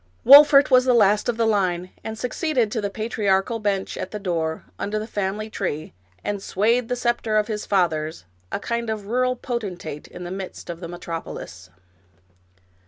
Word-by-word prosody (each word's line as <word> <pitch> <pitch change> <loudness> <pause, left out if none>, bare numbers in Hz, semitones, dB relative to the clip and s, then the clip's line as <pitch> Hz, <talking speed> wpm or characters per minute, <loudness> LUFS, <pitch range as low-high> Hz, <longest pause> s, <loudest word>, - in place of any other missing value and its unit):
Wolfert 285 0 +9
was 255 0 +6
the 250 -1 +4
last 210 0 +4
of 235 - -1
the 230 - +2
line, 185 -4 0
and 220 0 -5
succeeded 250 -2 0
to 220 - -1
the 200 - -2
patri 215 0 -3
archal 195 +4 +2
bench 200 -2 -1
at - - -4
the 210 - -5
door, 165 -5 -2 0.2
under 210 +1 -2
the 215 - -3
family 210 0 -3
tree, 175 -8 -4 0.3
and 205 -1 -3
swayed 225 +6 +1
the 250 - 0
scepter 240 -3 0
of 210 - +3
his 210 -1 -4
fathers, 160 - 0
— - - -36
a - - -2
kind 235 +1 -3
of 215 -2 -3
rural 255 +4 +1
potentate 190 - -5
in 180 - -9
the 175 - -6
midst 190 -2 -6
of 170 - -8
the 170 - -6
metropolis. 165 - -7
210 Hz, 185 wpm, -23 LUFS, 180-235 Hz, 0.3 s, Wolfert